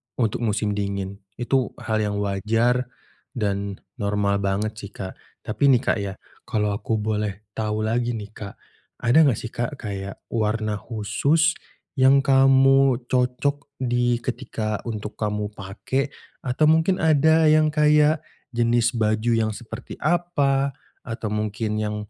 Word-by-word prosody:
untuk 115 -3 0
musim 105 0 0
dingin. 100 -1 -3 0.2
Itu 130 +1 0
hal 110 -2 -1
yang 105 0 -2
wajar 115 +5 +1 0.5
dan 100 -3 -2 0.2
normal 100 -1 +1
banget 100 +2 -1
sih, 100 - -8
Kak. 95 -1 -7 0.3
Tapi 110 +6 -3
nih, 125 - +1
Kak, - - +1
ya 100 -1 -3 0.3
kalau 105 -1 0
aku 110 +2 -2
boleh 105 -1 -2
tahu 110 0 -2
lagi 120 +2 0
nih, 105 -1 -7
Kak, 100 -2 -9 0.5
ada 120 +6 +4
nggak 120 - +1
sih, 115 - -6
Kak, 120 +4 -3
kayak 100 -5 -6
warna 110 -2 -1
khusus, 120 +10 +1 0.5
yang 135 +1 +6
kamu 135 -1 +5 0.2
cocok 130 +3 0
di 120 -2 0
ketika 115 -4 -3
untuk 105 -1 -5
kamu 105 -1 -2
pakai, 105 +8 -3 0.3
atau 130 +4 -1
mungkin 160 +4 +3
ada 160 +1 +4
yang 155 0 +5
kayak 150 +1 +4 0.3
jenis 120 0 +2
baju 110 +1 +1
yang 110 -1 +1
seperti 110 +1 -9
apa, 145 -5 +1 0.3
atau 115 -2 -5
mungkin 105 0 -2
yang 105 0 -2
115 Hz, 140 wpm, -23 LUFS, 105-135 Hz, 0.5 s, yang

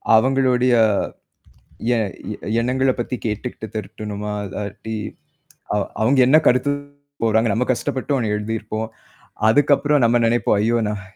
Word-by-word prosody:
அவுங்களுடைய 125 0 +3 1.2
எ - - +1 0.6
எண்ணங்களப் 130 +1 +1
பத்தி 125 +2 -3
கேட்டுட்டு 110 +1 -4
திருத்தணுமா 105 0 -5
இல்லாட்டி, 105 +3 -6 0.8
அ, - - +1
அவுங் 105 - 0 0.2
அவுங்க 130 +4 +3
என்ன 150 +4 +6
கருத்து 130 +3 +3 0.5
கூறாங்க. 110 0 +3
நம்ம 125 +2 0
கஷ்டப்பட்டு 130 +3 -2
ஒன்னு 110 -4 -1
எழுதி 105 +2 -3
இருப்போம். 110 +1 -4 0.6
அதுக்கப்புறம் 145 +1 +3
நம்ம 120 +1 +3
நினைப்போம். 120 -2 +2
ஐயோ! 115 +2 +2
நான் 105 -1 -4
115 Hz, 125 wpm, -21 LUFS, 110-130 Hz, 1.2 s, என்ன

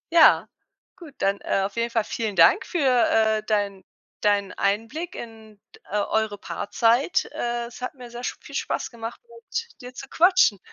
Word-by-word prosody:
Ja, 325 - +7 0.5
gut, 330 -6 -13
dann, 195 +1 0
äh, 195 - 0
auf 200 - -6
jeden 235 0 0
Fall 230 -2 +1
vielen 215 -3 -3
Dank 165 -1 +5
für, 350 - -3 0.3
äh, 220 -1 +3
dein 200 -3 -1 0.4
deinen 205 -2 +2
Einblick 225 - -2
in, 220 -3 -10 0.2
d - - -20
äh, 210 - 0
eure 210 0 0
Paarzeit. 235 - +1
Äh, 240 0 -2
es 240 +1 -11
hat 250 - -4
mir 245 -2 -11
sehr 240 +1 -8
sch - - -3
viel - - -13
Spaß - - -2
gemacht, 230 -1 -7
mit 465 - -7
dir 250 +1 -9
zu - - -8
quatschen. 350 - +4
225 Hz, 180 wpm, -24 LUFS, 205-250 Hz, 0.5 s, Ja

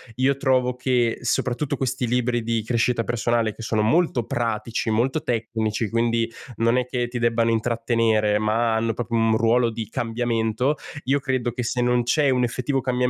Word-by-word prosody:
io 130 +2 +2
trovo 130 -2 +1
che 125 -2 0
soprattutto 125 +3 -1
questi 130 -1 -1
libri 120 0 0
di 115 0 0
crescita 115 +1 0
personale, 120 -2 0
che - - -10
sono 110 -1 0
molto 130 -1 +2
pratici, 115 -1 -2
molto 125 +8 0
tecnici, 110 -2 -2
quindi 115 0 +1 0.3
non 115 +2 +2
è 125 - +1
che 125 -1 -2
ti 120 0 -5
debbano 115 -1 +2
intrattenere, 115 -2 +1
ma 110 +2 +1
hanno 115 0 0
proprio 115 0 -3
un 115 -1 +3
ruolo 115 +1 +3
di 110 -2 -5
cambiamento, 115 +3 -1 0.3
io 140 +2 +2
credo 130 -2 -1
che 125 +1 -4
se 125 +2 -1
non 125 0 +2
c'è 140 +4 +2
un 125 -1 +2
effettivo 125 +3 -1
cambiamento 125 - +1
120 Hz, 175 wpm, -23 LUFS, 115-125 Hz, 0.3 s, un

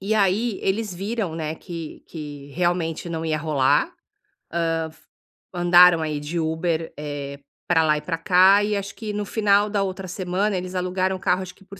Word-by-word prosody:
E 200 +3 -1
aí 210 +2 +1
eles 205 +1 -1
viram, 200 -1 -3
né, 160 -1 -3
que 165 -2 -8
que 145 -3 -8
realmente 175 -1 -1
não 165 -1 -4
ia 155 -1 0
rolar, 145 -4 +2 0.8
hã, 165 -1 -1 0.6
andaram 175 -1 +6
aí 155 -2 -2
de 150 +4 -3
Uber, 160 0 -1
eh, 145 -1 -6 0.3
pra 165 -2 +4
lá 150 -1 +3
e - - -4
pra 165 +2 -3
cá, 185 +4 +5
e 210 0 0
acho 200 0 -5
que 220 -2 -5
no 210 0 -3
final 205 -1 +2
da 205 -1 0
outra 190 0 -4
semana 185 +3 -1
eles 185 +1 -5
alugaram 185 +1 0
o - - -7
carro, 180 +1 +1
acho 185 -1 -8
que 195 - -21
por 195 0 -12
180 Hz, 190 wpm, -23 LUFS, 160-195 Hz, 0.8 s, andaram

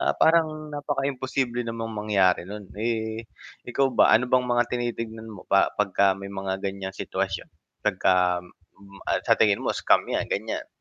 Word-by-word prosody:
ah, - - +1
parang 155 -2 +2
napaka 145 -1 -2
imposible 130 -2 -1
namang 115 -1 -4
mangyari 100 -4 +2
no'n, 100 -1 -8
eh, 110 -1 -2 0.4
ikaw 135 +2 +2
ba - - +5
ano 120 +3 +4
bang 125 -1 +3
mga 120 0 +3
tinitignan 115 -2 -4
mo 105 -4 -10
pa 100 - +4
pagka 100 -1 +3
may 100 0 -8
mga 95 -1 -3
ganyang 95 -1 -4
sitwasyon - - -3 0.3
pagka 90 -1 +3 0.4
m 100 0 -15 0.3
sa - - +6
tingin 105 -2 +3
mo - - -1
scam - - +3
yan, - - 0
gan'yan? 110 +2 -2
110 Hz, 160 wpm, -25 LUFS, 100-125 Hz, 0.4 s, sa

